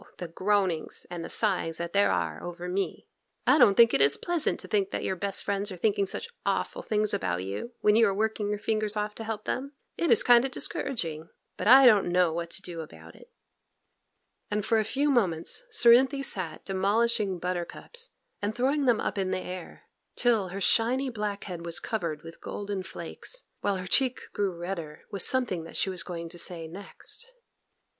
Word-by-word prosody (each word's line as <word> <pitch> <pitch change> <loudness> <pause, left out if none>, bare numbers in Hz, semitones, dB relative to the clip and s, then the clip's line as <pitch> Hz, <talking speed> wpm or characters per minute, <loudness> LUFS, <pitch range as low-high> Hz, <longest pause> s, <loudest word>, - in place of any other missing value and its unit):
the 175 - -5
groanings 185 -1 0
and 175 -1 -5
the - - -6
sighings 180 -6 0
that 170 0 -4
there 200 0 +4
are - - -1
over 175 0 -6
me! 190 +2 -2 0.4
'I 300 - +5
don't 200 -6 +6
think 230 -1 +7
it 135 - +3
is 140 +1 +5
pleasant 345 -3 0
to - - -10
think 200 -2 +1
that - - -3
your 190 - -1
best 200 +2 0
friends 200 +1 -1
are 185 - -7
thinking 200 +1 +1
such 465 - -3 0.2
awful - - -1
things 210 -1 0
about 90 -1 -1
you 100 - -5
when 210 0 +4
you 225 0 +6
are 195 - +1
working 215 0 -1
your 210 - -1
fingers 215 0 -1
off 210 0 -2
to 225 - -7
help 220 -1 -4
them; 275 +3 -3 0.2
it 335 - 0
is 230 - +6
kind 240 -1 +6
o' - - +1
discouraging, 165 - -3 0.3
but - - -3
I 265 +3 +9
don't 210 -7 +5
know 180 -2 +3
what 170 0 -3
to 190 - -2
do 170 -2 -6
about 80 - -12
it;' - - -17 1.2
and 210 0 -1
for 225 0 +3
a - - +2
few 280 +7 +1
moments 190 - 0
Cerinthy 265 - +5
sat 175 -10 -1
demolishing 200 +1 +1
buttercups 180 - -4 0.3
and 205 +1 -2
throwing 275 +4 +1
them 240 -4 +3
up - - -2
in 190 -1 0
the - - 0
air, 185 -1 -7 0.3
till 225 -6 +2
her 190 +2 -6
shiny 250 +6 +2
black 210 -3 -3
head 175 -3 -6
was 170 0 -4
covered 170 -10 -3
with 165 0 -11
golden 200 -1 -4
flakes, - - -6 0.2
while 200 -1 0
her 185 -1 -5
cheek 250 +4 +1
grew 200 -1 0
redder 170 -4 -6
with 200 - -1
something 245 -10 +1
that - - -5
she 190 - 0
was 180 -2 -1
going 170 -1 -6
to 175 - -7
say 165 -2 -2
next. 200 - -6
200 Hz, 200 wpm, -28 LUFS, 175-230 Hz, 1.2 s, I